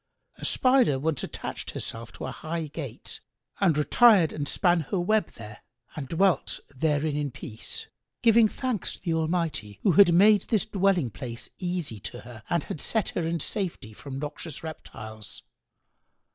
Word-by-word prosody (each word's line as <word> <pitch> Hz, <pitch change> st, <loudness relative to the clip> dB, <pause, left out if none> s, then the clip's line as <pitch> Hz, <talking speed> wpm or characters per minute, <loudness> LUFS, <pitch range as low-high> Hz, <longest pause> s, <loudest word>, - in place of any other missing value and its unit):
A -, -, -4 dB
Spider 255 Hz, -, +4 dB
once 150 Hz, +1 st, -1 dB
attached -, -, -5 dB
herself 115 Hz, 0 st, -5 dB
to -, -, -6 dB
a 130 Hz, -, -4 dB
high 160 Hz, +3 st, -4 dB
gate[FN#94] 140 Hz, -6 st, -6 dB, 0.4 s
and 175 Hz, -7 st, +3 dB
a -, -, +2 dB
retired 205 Hz, -1 st, +5 dB
and 145 Hz, -1 st, -3 dB
span 175 Hz, -2 st, +3 dB
her 195 Hz, -, 0 dB
web 210 Hz, +1 st, +2 dB
there 105 Hz, -2 st, -10 dB, 0.4 s
and 145 Hz, -3 st, -5 dB
dwelt 185 Hz, +5 st, +1 dB, 0.2 s
therein 150 Hz, +1 st, +1 dB
in 145 Hz, -1 st, -1 dB
peace, 120 Hz, -, -7 dB, 0.4 s
giving 230 Hz, -1 st, +6 dB
thanks 245 Hz, -3 st, -2 dB
to -, -, -19 dB
the 170 Hz, -3 st, 0 dB
Almighty, 160 Hz, -, -1 dB
who 195 Hz, -, +5 dB
had 175 Hz, +2 st, +7 dB
made 200 Hz, +3 st, +5 dB
this 215 Hz, -5 st, +1 dB
dwelling 190 Hz, -, +1 dB
place 115 Hz, +5 st, -7 dB
easy 175 Hz, -, -3 dB
to -, -, -7 dB
her 120 Hz, -2 st, -11 dB
and 170 Hz, -3 st, +1 dB
had 150 Hz, -, -5 dB
set 220 Hz, -3 st, +1 dB
her -, -, -2 dB
in 170 Hz, 0 st, -1 dB
safety 170 Hz, -, -3 dB
from 135 Hz, +4 st, -8 dB
noxious 150 Hz, +2 st, -6 dB
reptiles. 110 Hz, -9 st, -9 dB
160 Hz, 165 wpm, -27 LUFS, 135-195 Hz, 0.4 s, had